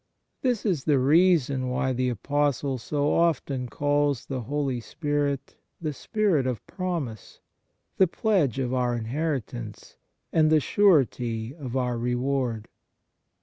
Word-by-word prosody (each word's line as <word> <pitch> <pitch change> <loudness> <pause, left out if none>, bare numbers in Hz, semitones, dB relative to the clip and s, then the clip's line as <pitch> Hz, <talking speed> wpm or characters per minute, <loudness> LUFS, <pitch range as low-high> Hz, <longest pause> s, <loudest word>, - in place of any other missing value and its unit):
1 260 - +2
This 235 -3 -1
is 175 -10 0
the 150 -3 +4
reason 140 -2 +3
why 130 +1 0
the 125 0 0
Apostle 140 +2 0
so 145 +4 0
often 140 -6 +1
calls 145 -2 0
the 130 -2 -4
Holy 140 0 -2
Spirit 145 +2 -2 0.3
the 155 -3 -3
Spirit 180 - 0
of 125 -4 -3
promise, 165 - -5 0.6
the 190 - +5
Pledge 175 - +1
of 130 -2 -1
our 125 -1 +1
inheritance, 125 - -4 0.4
and 155 -1 +4
the 155 0 +5
Surety 130 - +2
of 135 -5 -5
our 125 -2 -1
reward. 125 -2 -1
140 Hz, 130 wpm, -26 LUFS, 125-155 Hz, 0.6 s, the